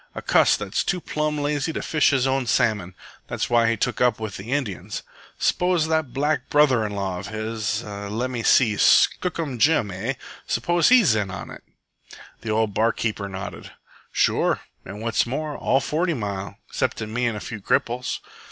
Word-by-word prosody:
"A - - -5
cuss - - +4
that's - - -2
too 180 - -1
plumb 150 -2 -2
lazy 145 +1 -1
to - - -3
fish 150 -2 +3
his 135 -3 +2
own 135 -1 0
salmon. 105 -7 +1 0.3
That's - - -3
why 115 -1 +4
he 115 - 0
took 120 +4 -1
up 125 -3 +3
with 110 -3 -5
the 105 +6 -8
Indians. 105 -8 -3 0.3
S'pose 180 -3 +2
that 160 -5 0
black 145 +4 -1
brother 140 -6 +4
in 105 -1 -3
law 95 -2 -2
of 100 - -7
his, 110 0 -3
lemme 110 +4 -4
see, 110 -4 +4
Skookum 160 -8 +3
Jim, 140 -7 +3
eh? 105 +8 -2 0.3
s'pose 175 -1 +2
he's 235 - +6
in 105 -3 -1
on 95 0 -7
it?" - - -11 0.8
The 115 - -7
old 110 -1 +1
bar 115 +3 +3
keeper 105 -3 -3
nodded. 95 +1 -7 0.4
"Sure, - - +2 0.2
an' 100 +3 -8
what's 115 +1 +1
more, 150 +4 -3
all 135 - +2
Forty 165 +4 0
Mile, 100 -4 -4
exceptin' 110 -1 -2
me 125 +1 +1
an' 115 - -1
a - - -4
few 110 -1 -7
cripples." 120 +5 -1
115 Hz, 180 wpm, -23 LUFS, 105-145 Hz, 0.8 s, he's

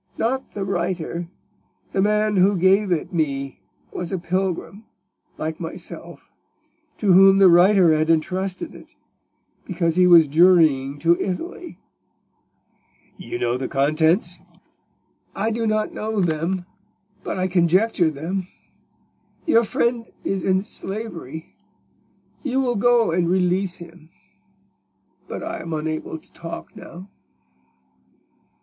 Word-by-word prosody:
"Not 260 +4 -2
the 200 -2 -3
writer. 175 -2 -3 0.6
The 190 - 0
man 210 0 +1
who 190 +2 +4
gave 190 +2 +3
it 175 +2 -1
me 140 - -2 0.3
was 180 -2 -5
a 190 - -1
pilgrim, 185 +4 -3 0.5
like 160 0 -4
myself, 165 -1 -9 0.7
to 200 -4 +3
whom 195 +1 +7
the 195 -1 +7
writer 180 -1 +5
had 155 +1 +1
intrusted 185 +4 -1
it, - - -15 0.7
because 170 -2 -1
he 180 0 +5
was 170 -3 +7
journeying 155 -4 +4
to 170 +1 +3
Italy." 335 - -5 1.4
"You 180 - -6
know 120 -5 -1
the 130 0 -4
contents?" 155 +7 +1 1.0
"I 220 +3 -1
do 225 0 -1
not 215 0 0
know 215 0 -3
them, 175 +1 -1 0.6
but - - -4
I 185 0 0
conjecture 180 +1 +2
them. 175 +6 -4 1.0
Your 235 -9 +4
friend 235 +1 -1 0.2
is 195 -2 -2
in 190 0 +1
slavery: 190 - -7 0.9
you 265 -2 -1
will 250 -2 +1
go 235 -1 +3
and 170 0 +1
release 185 0 +1
him. 170 -1 -14 1.2
But - - -6
I - - -5
am 165 - -6
unable 155 +1 -4
to - - -22
talk 165 0 -8
now." 180 +3 -11
180 Hz, 120 wpm, -22 LUFS, 165-200 Hz, 1.4 s, whom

